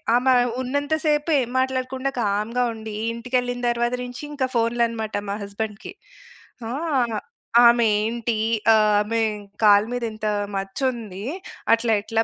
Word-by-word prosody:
ఆమె 255 +1 +4 0.3
ఉన్నంత 285 +4 -1
సేపు 300 +1 +1
ఏం 240 - -3
మాట్లాడకుండా 260 +1 -1
కామ్‌గా 215 +4 0
ఉండి, 220 -1 -7 0.2
ఇంటికెళ్ళిన 245 +1 -2
తర్వాత 240 +1 0
నించి 245 +3 -8
ఇంక 280 -3 -1
ఫోన్‌లనమాట 230 -1 0
మా 200 - -1
హస్బెండ్‌కి. 205 +1 -5 0.8
ఆ! - - -4 0.9
"ఆమేంటి? 230 0 +2 0.3
ఆహ్, 215 -1 +4
ఆమె 225 +2 -1 0.4
కాళ్ళ 205 0 +6
మీద 245 -1 -3
ఇంత 215 0 -4 0.3
మచ్చుంది. 205 0 -3 0.5
అట్లా 230 -1 0
ఎట్లా 225 +1 0
235 Hz, 120 wpm, -23 LUFS, 215-250 Hz, 0.9 s, కాళ్ళ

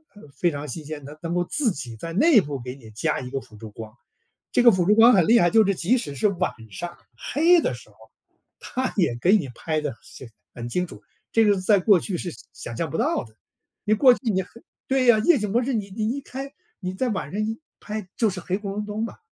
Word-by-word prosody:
呃， 205 - -14
非 175 +4 +1
常 145 0 -6
新 155 +5 -5
鲜， 150 -2 -7
它 150 +2 -10
能 170 0 -3
够 175 - +1
自 245 +4 +1
己 125 -9 -6
在 165 +9 -7
内 260 - +5
部 145 -2 -5
给 125 +1 -7
你 120 -5 -14
加 110 - -1
一 125 - -7
个 135 - -2
辅 110 - -17
助 110 0 -10
光。 110 +1 -10 0.6
这 245 - +3
个 240 - +9
辅 185 -4 +1
助 210 - +5
光 230 +3 +7
很 185 -6 +4
厉 235 +1 +6
害， 175 - +4
就 220 0 +6
是 200 0 +1
即 205 +10 +2
使 145 -11 -5
是 210 - +2
晚 185 -1 -1 0.2
上 170 - -6 0.2
黑 335 +4 +3
的 - - -1
时 - - -14
候， - - -24 0.6
它 255 0 -3
也 170 -10 +2
给 185 - +4
你 140 -9 -4
拍 155 +2 -2
得 145 -5 -3
是 125 - -12 0.3
很 120 -1 -6
清 180 +7 -1
楚， - - -13 0.3
这 225 -1 +4
个 205 - +5
是 190 - -3
在 205 +2 +4
过 190 -1 +5
去 185 -1 -3
是 175 - -4 0.2
想 115 - -7
象 160 +6 -2
不 160 - -3
到 - - 0
的， 110 -1 -17 0.5
你 215 - +2
过 255 +3 +6
去 - - -12
你 190 -1 +1
黑 180 - -12 0.4
对 265 -1 +2
呀， 240 -3 +6
夜 285 +7 +4
景 210 -2 -2
模 240 +4 +2
式 265 +1 -1
你 200 -3 -3
你 215 +1 -2
一 280 - -4
开， 275 +1 -7 0.3
你 185 -2 -4
在 250 +6 -1
晚 190 -8 -3
上 205 - -3
一 220 +1 -3 0.2
拍 210 -2 -6
就 225 -3 +3
是 185 - -6
黑 180 +2 -2
咕 200 -1 -5
隆 210 +1 -3
咚 210 +1 -3
嘛， - - -9
190 Hz, 280 characters per minute, -24 LUFS, 150-225 Hz, 0.6 s, 个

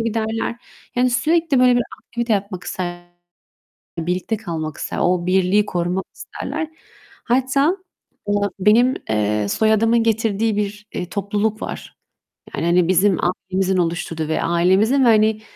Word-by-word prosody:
giderler. 225 +1 -2 0.4
Yani, 250 +1 +2
sürekli 310 +2 +2
böyle 250 -1 +5
bir 245 - +2 0.2
aktivite 235 -1 -3
yapmak 200 -2 -2
isterler, 175 -1 -5 0.9
birlikte 180 +6 -2
kalmak 160 -7 -5
ister, - - -4
o 175 -1 +1
birliği 190 +3 +3
korumak 180 +1 -2
isterler. 310 +3 -5 0.5
Hatta, 265 +7 +2 0.5
aaa, 205 0 +1
benim, 235 +6 +4
eee, 105 -1 0
soyadımın 225 - +3
getirdiği 225 -1 +1
bir, 210 0 -3
eee, 180 -1 -4
topluluk 205 +3 -1
var. - - -7 0.6
Yani, - - -2
hani, 175 0 +3
bizim 185 0 +3 0.3
ailemizin 190 0 +1
oluşturduğu 165 -2 -2
ve 160 - -1
ailemizin 190 +10 +3
ve, - - +5
hani, 215 0 +3
205 Hz, 130 wpm, -20 LUFS, 180-230 Hz, 0.9 s, böyle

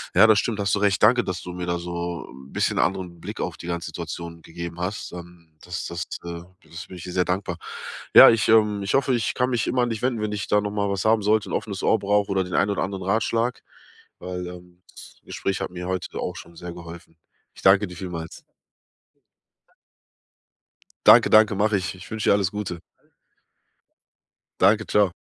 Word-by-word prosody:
Ja, 110 - +8
das 110 -2 +5
stimmt. 110 -2 -2
Hast 100 -2 +1
du - - -1
recht. 100 -2 +2
Danke, 125 +1 +5
dass 90 -2 -4
du 90 - -7
mir 90 0 -5
da 85 0 -1
so 85 0 -5
'n 65 +1 -14
bisschen - - 0
anderen 90 -2 -1
Blick - - -6
auf - - -4
die - - -10
ganze 85 -2 -3
Situation 85 +1 -7
gegeben 85 +1 -7
hast, 90 +4 -4
ähm, 85 -2 -12
das 90 0 -5
das 85 0 -4 0.2
äh, 85 0 -6 0.2
das 85 +3 -9
bin 90 - -10
ich 85 - -9
dir 90 - -7
sehr 90 0 +2
dankbar. 90 -2 -2 0.6
Ja, - - +12
ich, 115 -2 +2
ähm, 105 -2 +4
ich 100 - -2
hoffe, 135 -1 +2
ich 115 -2 -1
kann 125 0 +1
mich 120 -3 0
immer 125 - +1
an 120 - 0
dich 110 - -4
wenden, 125 -3 0
wenn 105 0 -2
ich 105 -3 -3
da 105 - +3
noch 105 - -3
mal 100 -1 -1
was 100 0 -2
haben 110 -1 +3
sollte, 105 0 +2
'n - - -5
offenes 100 -3 -3
Ohr - - +4
brauche 100 0 +1
oder 95 -1 +1
den 90 -1 -8
ein 100 - +2
oder 100 - 0
anderen 95 0 -4
Ratschlag, 115 +5 0 0.6
weil, 90 0 -5
ähm, 90 0 -12
das - - -14
Gespräch 95 -1 -3
hat - - -3
mir 90 0 -6
heute 95 -1 -4
auch - - -3
schon 85 0 -11
sehr 85 +1 -7
geholfen. 85 -1 -11 0.4
Ich - - -14
danke 100 +2 +5
dir 90 - -10
vielmals. 85 -3 -7 2.6
Danke, - - +8
danke, 110 -1 +6
mache 105 +1 +2
ich. 90 0 -4
Ich 95 +2 -12
wünsche 110 -1 -1
dir - - +6
alles 100 -2 +1
Gute. 105 -5 -4 1.8
Danke. 105 +3 +4
Ciao. 100 -3 +2
95 Hz, 210 wpm, -24 LUFS, 85-105 Hz, 2.6 s, Ja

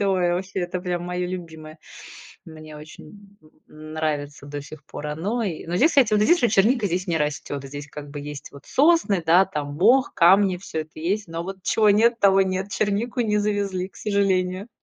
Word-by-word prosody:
А, 200 - +1
ой, 180 -2 +1
ваще, 190 +1 -3
это 180 +1 -3
прям 175 -1 -3
моё 180 0 -3
любимое. 160 -3 -8 0.7
Мне 155 -1 -11
очень 200 +6 -14 0.3
н 155 0 -11
нравится 145 -2 -3
до 145 0 -6
сих 150 0 -12
пор 150 0 -7
оно, 200 +11 -2
и 175 -7 -4
Но 170 - -4
здесь, 310 - +4
кстати, 255 -7 +3
вот 210 - +3
здесь 345 +9 +4
вот 240 - +3
черника 215 +2 +3
здесь 185 +2 -2
не 165 - +1
растёт. 150 -2 -3
Здесь 145 +1 -8
как 145 -1 -9
бы 145 0 -7
есть 145 -1 -8
вот 140 0 -14
сосны, 280 - +3
да, 175 +4 +6
там 145 -5 -5
мох, 245 +9 +3
камни, 190 +2 +5
всё 160 -4 -5
это 155 0 -14
есть. 200 +5 -1
Но 165 +1 -4
вот 195 +1 -6
чего 215 -2 +3
нет, 230 +3 +3
того 195 -1 +5
нет. 190 +1 -3
Чернику 215 +5 -1
не 210 -2 +1
завезли, 200 -3 -1
к - - -22
сожалению. 195 -1 0
185 Hz, 200 wpm, -23 LUFS, 155-205 Hz, 0.7 s, да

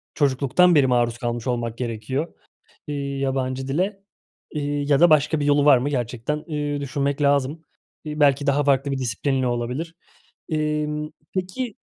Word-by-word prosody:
çocukluktan 145 +5 +3
beri 140 -3 +5
maruz 120 -2 +1
kalmış 120 0 -3
olmak 120 -2 -2
gerekiyor, 125 +6 -3 0.5
eee, 150 - -3 0.2
yabancı 135 -1 -2
dile, 190 +8 -1 0.5
iii, 145 -1 -2
ya 140 - +5
da 175 +1 +7
başka 155 0 +3
bir 145 - -1
yolu 145 0 +3
var 145 -3 +7
mı, 130 +4 -1
gerçekten, 125 +3 -2
iii, 145 -2 -2
düşünmek 140 +1 -2
lazım. 140 +2 +1 0.4
İii, 150 0 -5
belki 140 -1 +3
daha 140 +1 +3
farklı 140 0 +2
bir 135 - -1
disiplinle 130 +2 -1
olabilir. 125 +8 -3 0.5
Emm, 150 -1 -1 0.2
peki 190 +6 -3
140 Hz, 150 wpm, -23 LUFS, 130-150 Hz, 0.5 s, da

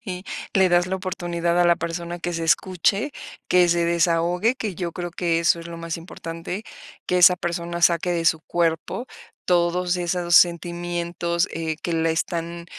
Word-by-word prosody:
Y 185 -2 -6 0.3
le 190 -1 +5
das 175 0 +3
la 190 +1 -2
oportunidad 175 -2 -1
a - - +4
la 170 0 +4
persona 170 +1 -4
que 175 0 -3
se 165 0 -3
escuche, 190 - +1 0.3
que 180 -1 +4
se 170 0 +2
desahogue, 170 +5 +2
que 215 -7 -4
yo 170 0 -4
creo 175 0 -5
que 170 -1 0
eso 170 0 +2
es 165 - -9
lo 170 0 -8
más 165 0 -5
importante, 165 +3 -7 0.4
que 180 - +1
esa 180 0 +7
persona 170 0 -4
saque 170 +1 +3
de 165 -1 -1
su 160 -1 +3
cuerpo 170 +8 -1 0.4
todos 180 0 +1
esos 175 -1 -1
sentimientos, 170 0 +1
eh, 160 -1 -3
que 170 - -2
la 165 0 +1
están 170 +1 -3
175 Hz, 175 wpm, -23 LUFS, 170-180 Hz, 0.4 s, esa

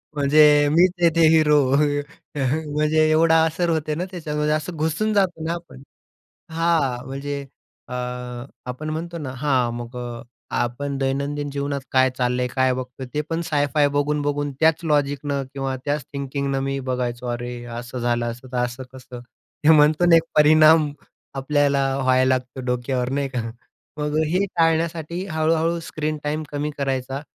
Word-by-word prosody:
म्हणजे 145 +1 +5
मीच 175 +3 +5
आहे 170 - +6
ते 165 -1 +5
हिरो. 150 -2 +5 0.8
म्हणजे 150 +3 +1
एवढा 160 +1 +4
असर 170 +2 -1
होते 155 -2 -1
ना, 180 +3 -2
त्याच्यामध्ये 150 -3 -1
असं 160 +3 -3
घुसून 160 +8 0
जातो 180 -5 +1
ना 165 - -1
आपण, 170 -7 -9 0.7
हां. 160 -7 0
म्हणजे 140 +1 -5 0.4
अ, - - -6 0.8
आपण 155 +5 -5
म्हणतो 170 +2 -4
ना, 140 -5 -5
हां. 130 -4 +1
मग 120 +1 -7 0.6
आपण 135 +4 -2
दैनंदिन 140 +2 -2
जीवनात 140 0 -2
काय 130 0 +4
चाललंय, 125 0 0
काय 130 0 +1
बघतो, 130 +1 -6
ते 150 - 0
पण 165 +1 -1
साय-फाय 145 0 +2
बघून-बघून 145 0 -1
त्याच 160 +1 +3
लॉजिकनं 145 -2 0
किंवा 135 -1 -2
त्याच 145 -1 -1
थिंकिंगनं 140 0 -2
मी 135 0 -2
बघायचो. 125 -1 -2
अरे, 120 0 -4
असं 120 +1 -6
झालं, 120 0 0
असं 125 +2 -11
तर 125 - -3
असं 120 +2 -4
कसं? 125 -1 -10 0.5
हे 160 - +8
म्हणतो 150 +3 +4
ना, 170 -1 +6
एक 165 - +5
परिणाम 155 0 +6 0.4
आपल्याला 140 0 +1 0.2
व्हायला 130 0 +3
लागतो 130 +1 -6
डोक्यावर, 125 0 -1
नाही 140 0 -1
का. 125 -3 -2 0.6
मग 150 +1 -1
हे 185 +4 +1
टाळण्यासाठी 165 +2 0
हळू-हळू 160 +2 +1
स्क्रीन 155 -1 -3
टाईम 155 +1 -2
कमी 145 +1 -2
करायचा 135 0 -2
145 Hz, 150 wpm, -22 LUFS, 130-155 Hz, 0.8 s, हे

